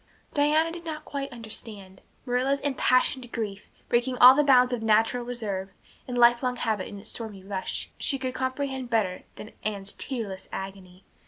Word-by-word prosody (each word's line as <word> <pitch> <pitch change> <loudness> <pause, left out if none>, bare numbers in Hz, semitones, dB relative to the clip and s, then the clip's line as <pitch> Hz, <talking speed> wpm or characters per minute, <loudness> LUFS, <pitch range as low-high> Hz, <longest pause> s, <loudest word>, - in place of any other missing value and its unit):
Diana 305 +3 +3
did 340 0 -8
not 310 -2 -6
quite 275 -1 -4
understand. 215 -5 -7 0.2
Marilla's 260 +2 +1
impassioned 255 -2 +1
grief, 210 -3 -4 0.2
breaking 245 +1 +1
all 250 +1 +10
the 295 +2 +3
bounds 250 -3 +5
of 240 - -2
natural 225 +2 +3
reserve 210 -6 -4 0.4
and 250 -1 -3
lifelong 240 +1 +4
habit 220 -5 -1
in 205 - -8
its 200 - -4
stormy 210 -5 -6
rush, 195 -1 -4
she 275 - 0
could 260 -1 -3
comprehend 260 0 -3
better 200 -6 0
than 215 - -10
Anne's 200 -2 -3
tearless 220 -8 -5
agony. 190 -1 -8
240 Hz, 160 wpm, -27 LUFS, 205-260 Hz, 0.4 s, all